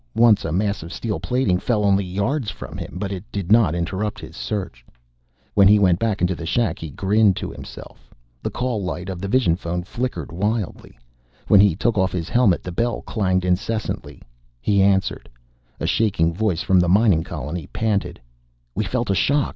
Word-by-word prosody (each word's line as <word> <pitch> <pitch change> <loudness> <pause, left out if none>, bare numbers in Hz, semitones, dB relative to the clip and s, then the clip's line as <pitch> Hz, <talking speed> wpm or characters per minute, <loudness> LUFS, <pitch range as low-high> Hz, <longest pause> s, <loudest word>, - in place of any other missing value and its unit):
Once 115 -3 +5
a 80 - -2
mass 100 +3 0
of 85 +1 -8
steel 105 0 -3
plating 125 -8 +1
fell 105 -2 0
only 100 0 +3
yards 100 +8 -1
from - - -8
him, - - -7
but 100 +1 -3
it 95 -2 -5
did 100 -2 -4
not 110 -8 +5
interrupt 100 +7 -2
his - - -10
search. 95 - -4 0.7
When 100 -1 +6
he 105 +1 +7
went 90 -3 +3
into 100 -5 +1
the 85 -1 -6
shack, 115 +7 0
he 80 - -6
grinned 100 +5 +2
to - - -5
himself. - - -11 0.3
The - - -2
call 120 -5 -2
light 90 0 -4
of 90 -2 -5
the 100 - -3
vision 110 -6 +3
phone 90 -1 -4
flickered 95 - -4
wildly. 100 - -3 0.5
When 100 - +6
he 100 -4 +5
took 110 +2 0
off 95 0 +2
his 85 -2 -3
helmet 115 -8 +3
the 90 - -5
bell 115 +6 -1
clanged 95 -4 0
incessantly. 105 +5 -2 0.4
He 100 +10 +2
answered. 95 0 +1 0.5
A - - -2
shaking 90 -7 +1
voice 95 -2 0
from 95 -3 +4
the 90 -1 +2
mining 95 -4 +4
colony 75 +1 -5
panted: 100 -6 -1 0.5
"We 110 - -1
felt 120 +1 -1
a - - +3
shock! 140 - +2
100 Hz, 185 wpm, -22 LUFS, 90-110 Hz, 0.7 s, he